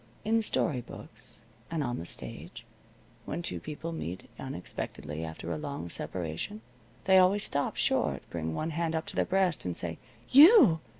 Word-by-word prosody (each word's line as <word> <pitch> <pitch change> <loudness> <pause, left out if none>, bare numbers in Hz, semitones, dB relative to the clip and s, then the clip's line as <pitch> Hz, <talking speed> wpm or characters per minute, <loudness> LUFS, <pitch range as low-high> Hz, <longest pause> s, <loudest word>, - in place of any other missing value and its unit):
In 225 +1 +3
story 155 - 0
books, 115 -1 -12 0.2
and 165 -3 -1
on 120 -2 -2
the 85 - -6
stage, - - -8 0.6
when 175 - -4
two - - -3
people 155 +2 -6
meet 95 - -5
unexpectedly 80 +2 -5
after 80 +1 -6
a 80 - -2
long 140 - -5
separation 90 - -4 0.4
they 190 0 +7
always 195 +2 +4
stop 140 0 -1
short, - - 0
bring 80 -1 -3
one 160 - -2
hand 165 0 -1
up 160 - -1
to - - -8
their - - +2
breast, 185 -2 +1
and 90 -2 -3
say: 85 -2 -4 0.3
"You!" 295 - +8
150 Hz, 165 wpm, -30 LUFS, -, 0.6 s, You